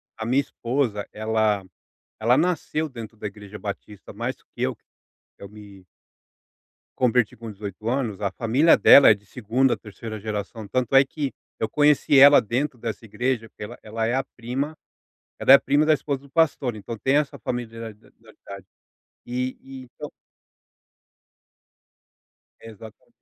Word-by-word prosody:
a 110 Hz, -, -6 dB
minha 130 Hz, +4 st, +3 dB
esposa, 120 Hz, -5 st, -2 dB
ela 110 Hz, -2 st, 0 dB, 0.5 s
ela 120 Hz, +4 st, +3 dB
nasceu 160 Hz, -2 st, -1 dB
dentro 115 Hz, -4 st, -10 dB
da 105 Hz, -, -5 dB
igreja 105 Hz, 0 st, -9 dB
Batista 100 Hz, 0 st, -8 dB
mais -, -, -3 dB
do -, -, -31 dB
que -, -, -6 dB
eu -, -, 0 dB
que -, -, -36 dB, 0.6 s
eu 100 Hz, -, -9 dB
me 100 Hz, -2 st, -14 dB, 1.1 s
converti 125 Hz, -3 st, +1 dB
com 115 Hz, 0 st, -8 dB
18 100 Hz, +1 st, -8 dB
anos, 120 Hz, -5 st, -1 dB
a 100 Hz, -2 st, -1 dB
família 125 Hz, -, +3 dB
dela 140 Hz, -, +8 dB
é -, -, +7 dB
de 105 Hz, -, -12 dB
2ª,, 125 Hz, +4 st, 0 dB
3ª 110 Hz, 0 st, -9 dB
geração, 105 Hz, +1 st, -5 dB
tanto 130 Hz, +3 st, -1 dB
é 135 Hz, 0 st, +7 dB
que 140 Hz, -1 st, -4 dB, 0.3 s
eu 110 Hz, -, -1 dB
conheci 145 Hz, 0 st, +3 dB
ela 140 Hz, -1 st, +9 dB
dentro 125 Hz, +5 st, -2 dB
dessa 110 Hz, -1 st, -5 dB
igreja 115 Hz, +2 st, -2 dB
porque 105 Hz, -, -9 dB
ela -, -, -10 dB
ela 110 Hz, +1 st, -3 dB
é 120 Hz, -, 0 dB
a 135 Hz, -, 0 dB
prima 130 Hz, +6 st, -4 dB, 0.6 s
ela -, -, +4 dB
é 135 Hz, -, +13 dB
a -, -, +5 dB
prima 145 Hz, +2 st, +2 dB
da 155 Hz, -, +5 dB
esposa 140 Hz, -2 st, -2 dB
do 140 Hz, -, -18 dB
pastor, 140 Hz, -7 st, +1 dB
então, 115 Hz, +2 st, -7 dB
tem 135 Hz, +6 st, +2 dB
essa 150 Hz, -2 st, -1 dB
familia 115 Hz, -2 st, -5 dB
da 105 Hz, -, -24 dB, 0.4 s
dade, 100 Hz, -2 st, -9 dB, 0.6 s
e 125 Hz, +1 st, -3 dB
e 135 Hz, -1 st, -10 dB
então. 120 Hz, -, -10 dB, 2.5 s
Exata 110 Hz, -1 st, -13 dB
115 Hz, 160 wpm, -24 LUFS, 105-135 Hz, 2.5 s, é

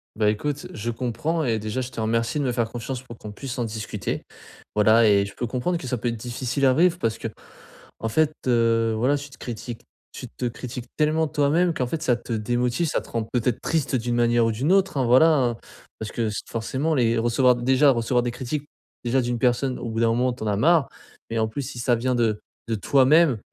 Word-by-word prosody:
Bah, 105 Hz, -1 st, +2 dB
écoute, 145 Hz, +7 st, -2 dB
je 110 Hz, +2 st, -4 dB
comprends 130 Hz, +8 st, -2 dB
et 115 Hz, -4 st, 0 dB
déjà 110 Hz, +4 st, -3 dB
je 125 Hz, 0 st, -5 dB
te 120 Hz, -, -7 dB
remercie 115 Hz, +6 st, 0 dB
de -, -, 0 dB
me 125 Hz, -, 0 dB
faire 115 Hz, -2 st, -1 dB
confiance 120 Hz, +2 st, -5 dB
pour 120 Hz, -3 st, -11 dB
qu'on 105 Hz, -, -9 dB
puisse 130 Hz, +4 st, -6 dB
en -, -, +1 dB
discuter, 110 Hz, -3 st, -4 dB, 0.5 s
voilà. 110 Hz, +2 st, +5 dB
Et 100 Hz, -1 st, +4 dB
je 100 Hz, -, -10 dB
peux 120 Hz, -, -3 dB
comprendre 130 Hz, +9 st, -1 dB
que 140 Hz, -, -8 dB
ça 125 Hz, -, -1 dB
peut 120 Hz, -, -3 dB
être 115 Hz, -, -3 dB
difficile 125 Hz, +4 st, -2 dB
à 130 Hz, -, +5 dB
vivre 175 Hz, +3 st, +3 dB
parce 115 Hz, -6 st, -1 dB
qu'en 115 Hz, 0 st, -9 dB
fait, 155 Hz, +4 st, +2 dB
heu, 115 Hz, -2 st, +3 dB
voilà, 130 Hz, +6 st, +2 dB
tu 145 Hz, 0 st, -8 dB
te 130 Hz, -, -15 dB
critiques 120 Hz, 0 st, -7 dB, 0.3 s
tu -, -, -8 dB
te 125 Hz, -, -6 dB
critiques 120 Hz, +1 st, -5 dB
tellement 155 Hz, +1 st, +2 dB
toi-même 155 Hz, +4 st, +2 dB
qu'en 130 Hz, -5 st, -1 dB
fait 155 Hz, +5 st, -4 dB
ça 125 Hz, -7 st, +2 dB
te 120 Hz, 0 st, -6 dB
démotive, 120 Hz, +8 st, 0 dB
ça -, -, 0 dB
te -, -, -13 dB
rend 115 Hz, -1 st, -1 dB
peut-être 120 Hz, -1 st, 0 dB
triste 140 Hz, -5 st, 0 dB
d'une 120 Hz, 0 st, -1 dB
manière 120 Hz, 0 st, +3 dB
ou 115 Hz, -, +1 dB
d'une 135 Hz, +10 st, 0 dB
autre, 190 Hz, -5 st, +2 dB
hein, 130 Hz, -, +2 dB
voilà, 130 Hz, +7 st, +6 dB
hein. 120 Hz, -3 st, +1 dB, 0.4 s
Parce 110 Hz, -, -5 dB
que 115 Hz, -2 st, -1 dB
s 105 Hz, -, -4 dB
forcément, 135 Hz, +7 st, -1 dB
les 115 Hz, -2 st, +2 dB
recevoir 120 Hz, +2 st, +3 dB
déjà 130 Hz, +4 st, +4 dB
recevoir 120 Hz, 0 st, +1 dB
des 120 Hz, -, -1 dB
critiques 140 Hz, +4 st, -4 dB, 0.4 s
déjà 130 Hz, +2 st, +2 dB
d'une 120 Hz, 0 st, -1 dB
personne 125 Hz, +2 st, +1 dB
au 120 Hz, -, -5 dB
bout 115 Hz, -, -3 dB
d'un 115 Hz, -, +3 dB
moment 125 Hz, +2 st, +1 dB
tu 120 Hz, -, -14 dB
en -, -, -2 dB
as 105 Hz, -, +1 dB
marre, 160 Hz, +3 st, +3 dB, 0.4 s
mais 115 Hz, -, -2 dB
en 110 Hz, -, +2 dB
plus 110 Hz, +6 st, -4 dB
si 125 Hz, -2 st, -7 dB
ça 120 Hz, 0 st, +2 dB
vient 125 Hz, +2 st, 0 dB
de 110 Hz, -3 st, +1 dB, 0.3 s
de 115 Hz, -, -1 dB
toi-même, 140 Hz, +4 st, +4 dB
120 Hz, 230 wpm, -24 LUFS, 115-135 Hz, 0.5 s, voilà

